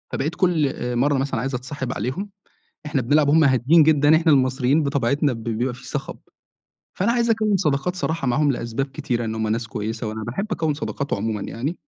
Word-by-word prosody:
فبقيت 155 +6 -2
كلّ 175 -5 +2
آآ 125 -2 -4
مرّة 140 +4 +2
مثلًا 135 -3 -1
عايز 135 +3 -2
أتصاحب 130 +1 -4
عليهم، 185 - -3 0.6
إحنا 150 -3 0
بنلعب 145 +4 +3
وهُم 160 +2 +5
هاديين 135 +4 +5
جدًا، 150 0 +5
إحنا 160 -1 +3
المصريين 130 +2 +2
بطبيعتنا 140 0 +1
ب 115 -2 -7
بيبقى 120 +2 -1
في 125 - -13
صخَب، - - -5 0.8
فأنا 200 +5 +1
عايز 235 -1 +1
أكوّن 215 -3 +2
صداقات 155 0 0
صراحة 160 -5 -2
معاهم 145 +4 +2
لأسباب 120 +1 -3
كتيرة، 120 -3 -3
إن 110 0 -3
هُم 110 0 -1
ناس 115 +2 -1
كويسة، 110 +2 -4
وأنا 110 0 -5
باحب 125 - -3
أكوّن 160 -6 0
صداقات 140 -1 -4
عمومًا 105 0 -2
يعني. 140 - -4
140 Hz, 190 wpm, -22 LUFS, 120-155 Hz, 0.8 s, وهُم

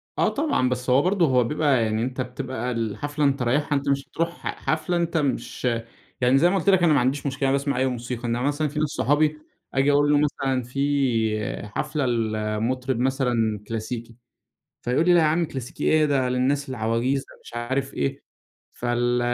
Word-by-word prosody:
آه - - +2
طبعًا، 280 - +1
بس 125 0 -3
هو 130 +2 +5
برضو 185 +1 +2
هو 125 -4 +3
بيبقى 140 -1 +2
يعني 110 0 0
أنت 130 +1 -3
بتبقى 125 -1 -4
الحفلة 145 +6 -2
أنت 140 -2 +1
رايحها، 145 +5 +1
أنت 140 +1 -2
مش 140 0 +1
تروح 165 +3 -2 0.2
حفلة 155 +3 -1
أنت 170 -1 0
مش 140 -3 -2 0.6
يعني 125 +2 +4
زي 175 +5 +5
ما 195 - +1
قُلت 195 - +1
لك 190 -3 +4
أنا 160 -3 +5
ما 140 - +4
عنديش 135 +3 0
مشكلة، 135 0 0
أنا 140 - +3
باسمع 140 -1 -2
أي 130 - +2
موسيقى، 120 -1 -4
إنما 120 +1 -1
مثلًا 145 +3 0
في 150 +1 -4
ناس 155 - +2
صحابي 150 +2 +1 0.4
آجي 135 +2 +3
أقول 145 +1 +3
له 145 - +5
مثلًا 135 -3 0
في 120 -6 -1
حفلة 150 -4 -1
لمطرب 115 +2 -1
مثلًا 125 -5 +1
كلاسيكي، 115 +1 -5 0.7
فيقول 125 +7 +1
لي 180 - +6
لأ 175 - +6
يا 160 - +3
عم 160 +3 +2
كلاسيكي 135 -1 -6
إيه؟ 155 -1 +4
ده 135 -3 +1
للناس 135 +3 0
العواجيز، 120 +2 0
ده - - -16
مش - - -12
عارف 130 +3 -2
إيه، 70 -1 -2 0.5
فال 120 0 0
130 Hz, 190 wpm, -24 LUFS, 120-145 Hz, 0.7 s, لي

